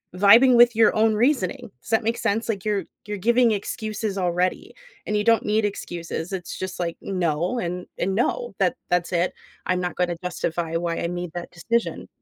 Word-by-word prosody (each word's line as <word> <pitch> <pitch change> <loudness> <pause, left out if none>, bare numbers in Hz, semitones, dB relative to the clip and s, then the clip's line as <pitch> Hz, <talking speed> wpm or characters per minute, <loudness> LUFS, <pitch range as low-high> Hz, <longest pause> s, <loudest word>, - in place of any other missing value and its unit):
vibing 230 +7 +7
with 240 -1 +6
your 225 -1 +4
own 220 0 +3
reasoning. 235 - 0
Does - - -14
that 225 +1 +3
make 230 +2 0
sense? 225 0 -1
Like, 200 -3 -2
you're 205 -4 0 0.2
you're 210 -1 -3
giving 240 -1 +5
excuses 215 0 -3
already, 180 0 -1 0.3
and 210 - -1
you 210 - +1
don't 230 -2 +4
need 215 +1 +2
excuses, 175 -3 -5
it's 180 -2 -5
just, 185 -1 -5
like, 170 -1 -2
"No, 175 +4 -1
and 180 -2 -4
and 190 +2 0
no. 485 - -1
That 255 - +2
that's 180 0 +1
it. 175 +1 +1 0.3
I'm 185 0 +1
not 180 - -3
gonna 175 -1 0
justify 170 -2 -2
why 170 0 -2
I - - -1
made 175 -1 -4
that 175 -1 -6
decision." 230 +7 -2
195 Hz, 190 wpm, -24 LUFS, 175-225 Hz, 0.3 s, vibing